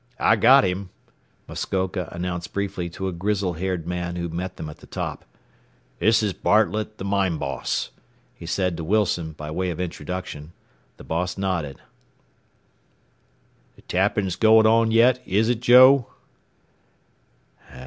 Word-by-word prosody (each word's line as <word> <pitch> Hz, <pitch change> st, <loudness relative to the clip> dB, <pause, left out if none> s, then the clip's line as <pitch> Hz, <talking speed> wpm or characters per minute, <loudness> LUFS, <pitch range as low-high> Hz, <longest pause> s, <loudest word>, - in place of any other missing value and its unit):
"I -, -, +4 dB
got 120 Hz, +6 st, +6 dB
him," 95 Hz, 0 st, -2 dB, 0.6 s
Muskoka 95 Hz, -1 st, -3 dB
announced 90 Hz, 0 st, -5 dB
briefly 100 Hz, -3 st, -3 dB
to 95 Hz, +3 st, -5 dB
a -, -, -2 dB
grizzle 95 Hz, +1 st, -1 dB
haired 90 Hz, 0 st, -3 dB
man 85 Hz, 0 st, -4 dB
who 85 Hz, -1 st, -3 dB
met 90 Hz, +3 st, -5 dB
them 80 Hz, -, -6 dB
at 75 Hz, -, -9 dB
the -, -, -16 dB
top. -, -, -5 dB, 0.7 s
"This 110 Hz, 0 st, +3 dB
is 105 Hz, -3 st, 0 dB
Bartlett, 110 Hz, +2 st, +1 dB
the -, -, -7 dB
mine 100 Hz, -4 st, 0 dB
boss," 70 Hz, -2 st, -3 dB, 0.4 s
he 85 Hz, -, -11 dB
said 90 Hz, -1 st, -1 dB
to 80 Hz, -, -5 dB
Wilson 90 Hz, -4 st, 0 dB
by 75 Hz, 0 st, -8 dB
way 90 Hz, +3 st, -2 dB
of 85 Hz, -1 st, -5 dB
introduction. 85 Hz, -2 st, -6 dB, 0.4 s
The -, -, -12 dB
boss 90 Hz, +3 st, -3 dB
nodded. 90 Hz, -8 st, -3 dB, 1.9 s
"The -, -, -21 dB
tapping's 95 Hz, 0 st, 0 dB
going 110 Hz, 0 st, +5 dB
on 115 Hz, +1 st, +4 dB
yet, 120 Hz, +3 st, +4 dB
is 105 Hz, +4 st, +1 dB
it, 120 Hz, -1 st, 0 dB
Joe?" 130 Hz, +1 st, +7 dB
95 Hz, 140 wpm, -23 LUFS, 85-110 Hz, 1.9 s, Joe